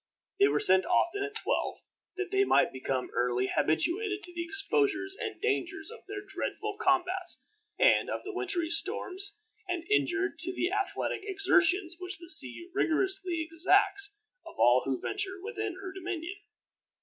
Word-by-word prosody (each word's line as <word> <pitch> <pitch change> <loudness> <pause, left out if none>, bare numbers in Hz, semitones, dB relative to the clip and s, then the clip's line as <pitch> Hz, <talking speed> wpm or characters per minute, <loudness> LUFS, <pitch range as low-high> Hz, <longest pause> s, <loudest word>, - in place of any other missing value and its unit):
They 400 - +6
were - - +1
sent 190 0 +7
often 400 +4 +1
at 410 +1 -4
twelve, 450 - -2 0.4
that 385 -1 -3
they 395 0 +3
might - - +2
become 130 0 -3
early 125 +1 0
habituated 395 - +1
to 355 - -2
the 340 0 -4
exposures 395 +1 0
and 430 -6 -5
dangers 435 +1 -2
of 470 - -11
their 405 0 -7
dreadful 425 -1 -4
combats, 370 -2 0 0.3
and - - +3
of - - -4
the 410 +2 -7
wintery 370 -4 -2
storms, 395 +2 +1 0.3
and 355 -2 -3
inured 380 -4 0
to 350 +3 -4
the 360 - -1
athletic 400 0 -2
exertions 375 -3 +2
which 365 +1 -5
the 340 +1 -4
sea 345 +2 +5
rigorously 370 -1 +1
exacts 395 +4 +2 0.3
of - - -13
all 120 +3 +4
who 135 -1 -2
venture 390 -2 -1
within 420 -1 -5
her 380 -1 -8
dominion. 355 0 -6
380 Hz, 155 wpm, -29 LUFS, 340-400 Hz, 0.4 s, sent